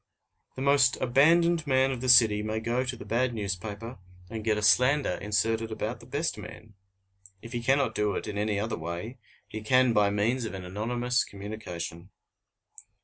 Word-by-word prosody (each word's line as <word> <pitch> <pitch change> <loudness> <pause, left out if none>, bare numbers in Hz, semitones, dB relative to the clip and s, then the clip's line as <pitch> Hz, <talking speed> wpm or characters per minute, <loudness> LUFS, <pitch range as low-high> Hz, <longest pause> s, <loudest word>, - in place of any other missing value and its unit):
The 130 - -4
most 140 -2 +3
abandoned 160 +5 +3
man 130 0 +3
of 125 -2 -5
the 130 - -1
city 110 -4 +6
may 110 +1 -2
go 120 +3 -1
to 125 -1 -4
the - - -10
bad 120 +1 0
newspaper 105 +2 -5 0.3
and 110 -1 -5
get 110 -1 +1
a 105 - -3
slander 130 +5 +4
inserted 110 +2 0
about 110 +2 -4
the 115 - -15
best 145 +5 -2
man. 110 -1 -11 0.7
If 115 +1 -9
he 120 - -2
cannot 135 +3 +2
do 105 -2 0
it - - -4
in 105 - -5
any 105 0 -1
other 110 -1 -3
way, 85 +10 -6 0.3
he 110 - -7
can 130 +2 +3
by 105 -2 +3
means 110 +5 0
of 105 - -5
an 95 -1 -7
anonymous 120 +6 -1
communication. 95 -4 -7
115 Hz, 180 wpm, -28 LUFS, 105-130 Hz, 0.7 s, city